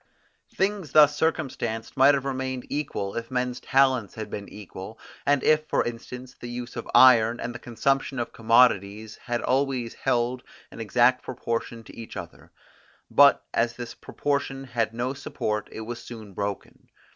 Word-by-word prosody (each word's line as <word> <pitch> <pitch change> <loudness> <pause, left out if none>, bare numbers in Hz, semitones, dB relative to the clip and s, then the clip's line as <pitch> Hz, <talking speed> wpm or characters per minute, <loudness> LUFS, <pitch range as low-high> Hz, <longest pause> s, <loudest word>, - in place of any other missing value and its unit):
Things 190 -6 -1
thus 145 -1 +7
circumstanced 125 -8 -2
might 135 +2 +6
have 135 -1 -3
remained 130 -1 -3
equal, 120 -9 -3
if 115 0 -4
men's 125 -1 -2
talents 130 -6 +2
had 110 -1 -6
been 100 -1 -6
equal, 105 +1 -9 0.3
and 145 -1 +3
if, 155 0 +3
for - - +1
instance, 125 +2 -7
the 120 - -9
use 120 0 -6
of - - -6
iron, 120 -2 +7
and 120 - -4
the 125 - -8
consumption 135 +3 -1
of 120 - -3
commodities 110 -2 +2
had 120 -1 -3
always 130 -3 0
held 120 +1 0 0.3
an - - -11
exact 120 +3 +3
proportion 115 -1 -4
to - - -14
each 115 -1 -9
other; - - -9 0.6
but - - +6
as 115 0 +1
this 120 -1 -7
proportion 140 -2 -3
had 115 -4 -1
no 120 +3 -2
support, 105 -6 -3
it - - -7
was 115 +2 -6
soon 110 -4 -10
broken. 100 +1 -5
120 Hz, 160 wpm, -26 LUFS, 115-135 Hz, 0.6 s, thus